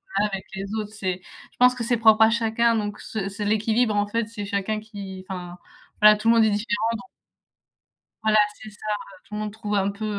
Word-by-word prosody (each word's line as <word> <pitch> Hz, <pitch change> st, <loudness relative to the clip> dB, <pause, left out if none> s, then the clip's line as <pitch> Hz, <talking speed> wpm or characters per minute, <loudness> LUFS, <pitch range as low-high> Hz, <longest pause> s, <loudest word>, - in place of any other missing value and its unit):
voilà, 210 Hz, +1 st, +2 dB
avec 195 Hz, -1 st, -5 dB
les 195 Hz, -, -4 dB
autres. 215 Hz, -1 st, -4 dB
C'est 190 Hz, -4 st, -3 dB
je -, -, -18 dB
pense 250 Hz, 0 st, +6 dB
que 245 Hz, -, -4 dB
c'est 240 Hz, +1 st, +1 dB
propre 220 Hz, -1 st, +5 dB
à 220 Hz, -, +8 dB
chacun 230 Hz, 0 st, +2 dB
donc 210 Hz, -1 st, -3 dB
ce 205 Hz, -3 st, -4 dB
c'est 205 Hz, +1 st, -5 dB
l'équilibre 220 Hz, +2 st, +2 dB
en 205 Hz, 0 st, +2 dB
fait, 230 Hz, +1 st, -1 dB
c'est 215 Hz, -2 st, -6 dB
chacun 200 Hz, +1 st, -1 dB
qui 200 Hz, -3 st, -9 dB
enfin 180 Hz, -2 st, -6 dB, 0.4 s
voilà, 210 Hz, 0 st, +8 dB
tout 215 Hz, +2 st, -4 dB
le 230 Hz, -, +6 dB
monde 225 Hz, -1 st, +5 dB
est 215 Hz, -, +3 dB
différent 210 Hz, +1 st, 0 dB
donc 245 Hz, +2 st, -7 dB, 1.2 s
Voilà 215 Hz, 0 st, +4 dB, 0.2 s
c'est 220 Hz, -, -11 dB
ça, 210 Hz, -, -18 dB
heu, 200 Hz, -2 st, -6 dB
tout -, -, -15 dB
le -, -, -3 dB
monde 210 Hz, -1 st, -4 dB
trouve 210 Hz, -1 st, -3 dB
un 200 Hz, 0 st, +1 dB
peu, 210 Hz, +2 st, -6 dB
215 Hz, 230 wpm, -24 LUFS, 205-225 Hz, 1.2 s, à